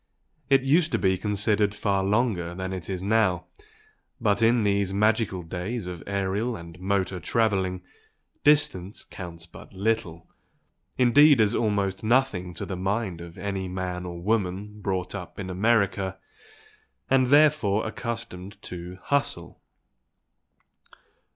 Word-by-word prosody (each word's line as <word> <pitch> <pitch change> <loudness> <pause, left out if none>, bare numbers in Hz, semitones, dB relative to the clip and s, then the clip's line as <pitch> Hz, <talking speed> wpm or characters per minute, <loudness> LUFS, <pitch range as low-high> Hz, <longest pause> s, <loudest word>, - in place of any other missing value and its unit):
It 135 -1 +5
used 155 +5 +3
to - - +3
be 95 -1 +2
considered 105 +1 +1
far 100 -2 0
longer 100 -5 0
than 95 0 -4
it 95 -1 -6
is 95 -1 -3
now 100 -4 +2 0.7
but 105 -3 +1
in 115 0 +4
these 100 -2 +1
magical 105 -2 +1
days 90 +6 -4
of 90 -2 -6
aerial 100 +4 -1
and 85 -1 -10
motor 95 -1 -1
travelling, 95 -5 0 0.6
distance 115 -10 +3
counts 85 -3 -9
but 85 - -14
little, 95 -4 -2 0.7
indeed 140 +3 +6
as 110 0 +3
almost 100 -4 0
nothing 110 -7 +1
to - - -4
the 95 - -4
mind 95 -1 -2
of 85 0 -10
any 95 -2 -3
man 90 -1 -4
or 85 -1 -6
woman 105 +1 -2
brought 95 -2 -2
up 95 -3 -7
in 95 -2 -4
America 100 -1 +1 0.9
and 130 -1 +3
therefore 145 -8 +4
accustomed 110 -4 -6
to 90 0 -7
"hustle." 140 0 -1
100 Hz, 130 wpm, -26 LUFS, 90-115 Hz, 0.9 s, indeed